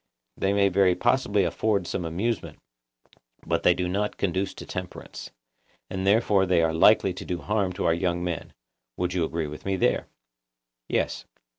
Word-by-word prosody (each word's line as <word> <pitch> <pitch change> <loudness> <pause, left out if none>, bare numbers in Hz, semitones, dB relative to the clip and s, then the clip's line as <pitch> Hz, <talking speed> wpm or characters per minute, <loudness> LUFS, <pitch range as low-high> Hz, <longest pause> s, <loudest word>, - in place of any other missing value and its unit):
They 95 - 0
may 100 0 +3
very 95 -1 +3
possibly 120 -4 +2
afford 100 +2 0
some 85 - -3
amusement, 100 +8 -2 0.9
but - - 0
they 90 - +4
do 90 - -1
not 100 +3 -2
conduce 95 +1 -1
to - - -9
temperance. - - -7 0.6
And 95 0 -2
therefore 100 -2 +3
they 90 -2 +3
are 80 0 +1
likely 95 +2 +5
to 95 +2 -7
do 90 -2 -3
harm 100 -1 -1
to 95 - -3
our 80 - +4
young 85 0 -1
men—you 85 -3 -4 0.5
would 90 0 -1
agree 85 -2 -1
with 75 0 -8
me 95 0 -1
there? 95 - +1 0.8
Yes. - - -1
95 Hz, 165 wpm, -26 LUFS, 85-100 Hz, 0.9 s, likely